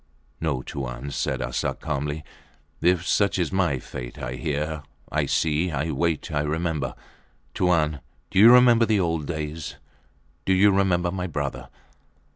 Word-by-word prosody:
No, 70 -6 -1
Tuan, 65 0 -5
said - - -1
Arsat, 60 +1 -2
calmly. 75 0 -3 0.6
If 90 0 +3
such 100 0 +2
is 90 -3 0
my 90 -7 +1
fate. - - -8
I - - -4
hear, 75 +4 -2 0.3
I 75 -2 0
see, 80 +5 +1
I 75 +1 -2
wait. 85 0 -1
I 75 -1 +1
remember... 75 -2 -2 0.6
Tuan, 80 -5 +2 0.3
do - - +2
you 115 +4 +10
remember 120 -2 +6
the 110 -2 +3
old 80 -5 -1
days? 80 -1 -4 0.7
Do 95 - +2
you 100 +2 +5
remember 90 -3 +2
my 90 -1 -3
brother? 70 -4 -4
80 Hz, 145 wpm, -25 LUFS, 75-90 Hz, 0.7 s, you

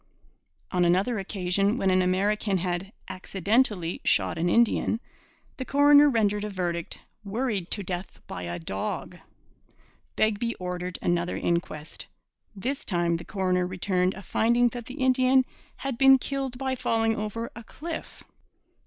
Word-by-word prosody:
On 180 -1 +2
another 190 +6 +2
occasion, 195 +2 0
when 195 -5 +2
an 185 0 +4
American 195 +2 +1
had 180 +2 -2 0.2
'accidentally' 190 0 0
shot - - +2
an 170 +1 0
Indian, 230 +1 +2 0.6
the 260 - -3
coroner 290 +2 +6
rendered 210 -4 +1
a 210 - -3
verdict 175 -3 -3 0.3
'worried 210 -3 -2
to 205 - -1
death 180 0 -5
by - - -7
a 85 0 -4
dog.' 95 +4 -4 1.0
Begbie 220 +2 +1
ordered 180 0 -4
another 175 0 0
inquest. 170 -3 -3 0.5
This 260 +8 -3
time 170 -2 0
the 170 - -8
coroner 185 -2 0
returned 185 0 0
a 195 - -9
finding 235 +5 +3
that 240 -1 -8
the 255 - -8
Indian 260 -1 +3 0.3
'had 270 -3 -4
been 270 0 +8
killed 270 -1 -3
by 265 0 -1
falling 225 -3 +1
over 215 +2 -4
a 235 - -9
cliff.' 325 +8 -7
200 Hz, 140 wpm, -27 LUFS, 180-240 Hz, 1.0 s, been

